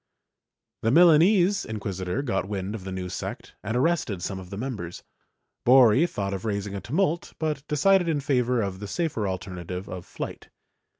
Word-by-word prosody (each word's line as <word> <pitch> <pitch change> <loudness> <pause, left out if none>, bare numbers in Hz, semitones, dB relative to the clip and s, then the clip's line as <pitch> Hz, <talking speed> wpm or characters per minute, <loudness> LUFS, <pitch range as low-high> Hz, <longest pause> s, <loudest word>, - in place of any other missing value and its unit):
The 115 - +1
Milanese 175 - +5
inquisitor 100 +1 -3
got 95 -7 -1
wind 100 0 -3
of 105 -4 -7
the 95 - -5
new 95 -1 -4
sect - - -6
and 110 +4 -1
arrested 130 - 0
some 95 0 -3
of 90 -1 -10
the 100 - -6
members; 105 -8 -5 0.6
Borri 130 +5 +6
thought 100 -1 -3
of 95 - -4
raising 100 -2 -2
a 100 - -4
tumult 165 - -1
but 155 -3 -2
decided 180 +4 +3
in 155 -3 +1
favor 125 -4 +1
of 95 -2 -4
the 105 - -6
safer 145 - -1
alternative 90 0 -5
of 90 -1 -7
flight. - - -7
110 Hz, 170 wpm, -26 LUFS, 95-150 Hz, 0.6 s, Borri